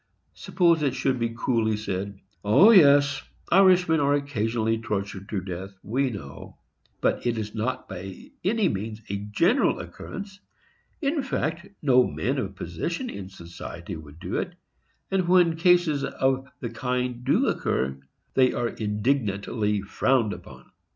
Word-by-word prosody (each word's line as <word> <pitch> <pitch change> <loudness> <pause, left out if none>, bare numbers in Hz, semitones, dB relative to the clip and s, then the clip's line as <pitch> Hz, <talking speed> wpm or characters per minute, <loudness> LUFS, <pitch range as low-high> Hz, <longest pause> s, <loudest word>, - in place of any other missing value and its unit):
Suppose 170 -4 +2
it 135 -3 0
should 130 -1 0
be 115 0 -2
coolly 115 -4 +1
said, 100 -1 -4 0.2
"O 145 - +7
yes, 145 -7 +6 0.3
Irishmen 180 -3 +5
are 145 0 +3
occasionally 115 -5 -1
tortured 100 -2 -4
to 100 -3 -2
death, 95 +2 -7
we 130 +6 0
know; 75 - -9 0.4
but - - +1
it 120 -1 0
is 110 -1 -4
not 115 +4 -3
by 95 0 -9
any 210 +2 +2
means 110 - -3
a 100 - -1
general 105 +1 +2
occurrence; 195 +1 -8 0.6
in 285 +2 +1
fact, 170 - -2 0.2
no 130 -3 +5
men 135 +2 -1
of 100 -5 -4
position 165 - -4
in 95 -2 -7
society 85 0 -8
would 80 0 -12
do 95 - -3
it; 180 -2 -3 0.6
and 190 -2 +1
when 175 -2 +5
cases 170 -4 +3
of 135 0 0
the 120 -3 -4
kind 125 +1 -2
do 135 - +3
occur, 65 +1 -1 0.3
they 130 -1 +4
are 120 -1 -1
indignantly 105 -2 -1
frowned 115 +1 +1
upon." - - -13
120 Hz, 145 wpm, -26 LUFS, 100-150 Hz, 0.6 s, O